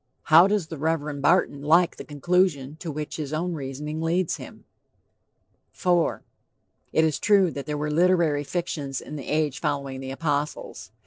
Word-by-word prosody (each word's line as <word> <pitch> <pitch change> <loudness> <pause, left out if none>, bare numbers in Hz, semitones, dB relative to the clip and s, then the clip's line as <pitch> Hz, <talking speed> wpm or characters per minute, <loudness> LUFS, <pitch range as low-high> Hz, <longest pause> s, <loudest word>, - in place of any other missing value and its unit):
How 170 +4 +9
does 205 -4 0
the 160 - -7
Reverend 150 -2 -1
Barton 145 -2 +2
like 165 +4 +3
the - - -7
conclusion 150 -2 0
to 165 0 -5
which 150 0 -5
his 150 -2 -5
own 175 +3 -1
reasoning 150 +2 -5
leads 170 +2 0
him? - - -12 1.1
IV. 175 -2 +1 0.7
"It 160 - +3
is 155 -3 0
true 195 -4 +4
that 140 -2 -7
there 150 -1 -2
were 150 +1 -2
literary 165 -3 +3
fictions 145 -3 -3
in 150 - -9
the 140 - -7
age 150 -3 0
following 140 -3 -2
the 130 0 -6
apostles." 145 +1 -3
155 Hz, 165 wpm, -25 LUFS, 145-170 Hz, 1.1 s, How